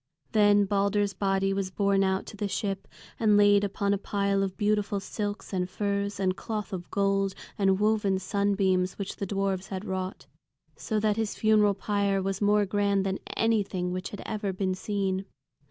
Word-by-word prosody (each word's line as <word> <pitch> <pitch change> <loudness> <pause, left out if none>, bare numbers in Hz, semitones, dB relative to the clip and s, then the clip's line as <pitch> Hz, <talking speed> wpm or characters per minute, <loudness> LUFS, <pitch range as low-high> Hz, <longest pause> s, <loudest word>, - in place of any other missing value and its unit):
Then 205 -1 +5
Balder's 200 0 +1
body 195 0 +1
was 195 -1 -2
borne 200 +1 +2
out 190 0 0
to - - -9
the 205 0 -2
ship 195 0 -3 0.3
and 210 -2 +4
laid 205 0 +5
upon 200 0 0
a 200 - -1
pile 200 -1 0
of 190 -1 -2
beautiful 210 -1 +1
silks, 205 +1 -5
and 180 -1 -1
furs, 200 0 -2
and 185 -1 +1
cloth 210 -1 -5
of 180 -2 -5
gold, 195 -1 +1 0.2
and 195 -1 +2
woven 210 -2 +2
sunbeams 190 -1 +1
which 200 -1 -5
the 200 - -3
dwarfs 195 -1 -1
had 190 +1 -5
wrought. 185 -7 -4 0.5
So 215 - -2
that 210 0 +1
his 220 -2 -1
funeral 210 -2 +3
pyre 200 0 0
was 195 +1 -2
more 205 0 +4
grand 200 0 +1
than 190 0 -1 0.2
anything 200 -5 +1
which 185 0 -4
had 205 - -8
ever 210 -3 -2
been 185 0 -1
seen. 195 0 -2
200 Hz, 175 wpm, -28 LUFS, 190-205 Hz, 0.5 s, Then